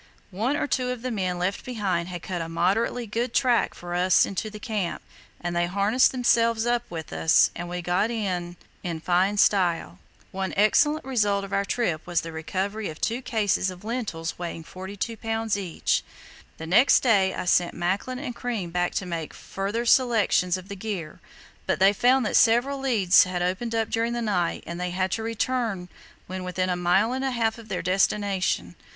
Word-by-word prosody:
"One 230 +10 0
or - - 0
two 255 -3 -1
of 250 -2 -4
the 255 - -2
men 185 -5 -1
left 185 +3 -2
behind 195 -8 -2
had 175 -2 -7
cut 180 -2 -3
a 165 - -5
moderately 210 +8 0
good 230 +3 -3
track 245 -3 +2
for 175 0 -7
us 180 +1 +4
into 200 +2 -4
the 210 - -9
camp, 205 -5 -3 0.4
and 175 0 -3
they 175 0 +1
harnessed 200 +7 +3
themselves 230 -2 +2
up 240 0 +2
with 160 -2 -7
us, 160 - +4
and 175 0 -5
we 180 0 -4
got 180 +5 +1
in 180 -6 -3 0.2
in 170 -3 -4
fine 185 +5 +1
style. 180 -4 +2 0.3
"One 190 0 -3
excellent 295 +9 +3
result 205 -6 +1
of 195 - -9
our 200 0 +1
trip 180 -8 -1
was 175 -1 +1
the 165 - -7
recovery 190 +6 -3
of 155 - -9
two 235 +3 -1
cases 210 -6 0
of 185 +1 -10
lentils 210 -10 -4
weighing 170 -2 -5
42 195 +6 -6
lbs. 225 -1 -1
each." 190 -5 -1 0.5
The 160 - -7
next 215 +11 +5
day 200 -6 +3
I - - -4
sent 175 -1 +2
Macklin 195 +9 -1
and 255 -3 -5
Crean 225 -9 -3
back 175 0 0
to 195 - -1
make 165 -3 -5
a - - -13
further 205 +5 -3
selection 230 -7 +3
of 185 0 -11
the 200 - -6
gear, 190 -6 -5 0.5
but - - +1
they 195 +2 +5
found 250 +4 +3
that - - -1
several 245 +5 +4
leads 215 -11 +4
had 180 -1 -2
opened 200 +6 -2
up 225 -1 +1
during 230 +1 0
the 240 - -2
night, 180 -6 -1
and 170 +1 -6
they 180 - -1
had 185 +1 -1
to 225 - -1
return 225 -4 -2 0.4
when 185 0 -6
within 185 0 -1
a - - +1
mile 180 +6 +2
and 265 +1 -2
a 270 - +1
half 230 -2 -1
of 225 - -13
their - - -3
destination. 185 - 0
200 Hz, 195 wpm, -25 LUFS, 180-230 Hz, 0.5 s, next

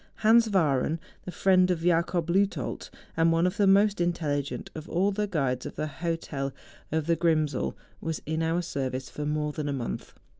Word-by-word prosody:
Hans 230 +1 +6
Wahreu, 155 -5 +2 0.3
the 180 - -5
friend 185 0 +4
of 175 -3 0
Jacob 170 0 +1
Leuthold, 195 +3 0 0.3
and 165 0 +3
one 165 +1 +3
of 180 +3 0
the 205 -2 +4
most 200 +1 +4
in¬ 175 0 +3
telligent 145 -4 -3
of 160 +1 -8
all 190 +4 +2
the 210 +1 -1
guides 135 -9 -1
of - - -9
the - - -2
hotel 155 -3 -3 0.4
of 160 0 0
the 170 +1 +2
Ctrimsel, 155 -4 +1 0.3
was 160 -1 -3
in 160 +1 -1
our 165 +2 0
service 130 -4 -3
for 150 0 -4
more 150 0 -1
than 150 -1 -3
a - - -1
month. 125 -4 -5
165 Hz, 190 wpm, -27 LUFS, 150-180 Hz, 0.4 s, Hans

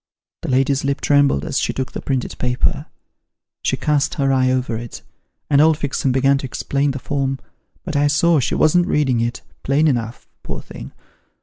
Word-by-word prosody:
" - - -75
The - - -5
lady's 135 +1 +1
lip 140 0 -1
trembled 145 - +2
as - - -1
she - - -1
took 130 -1 -4
the - - -6
printed 130 -2 -2
paper. 125 0 -1 0.7
She - - 0
cast 150 -2 0
her 135 -2 +1
eye 130 -1 +2
over 130 -2 0
it, 115 0 -7 0.4
and 145 -1 +4
old 160 0 +4
Fixem 140 -2 -1
began 135 +2 +3
to 135 - -5
explain 140 +3 -1
the 135 - -3
form, 135 0 -2 0.5
but 170 -4 -5
I 145 +1 +3
saw 155 +2 +3
she 125 - -1
wasn't 175 +3 +3
reading 135 -8 +1
it, 120 +1 -2 0.2
plain 145 +4 +2
enough, 120 -4 -2
poor - - -6
thing. - - -10
135 Hz, 190 wpm, -20 LUFS, 130-145 Hz, 0.7 s, and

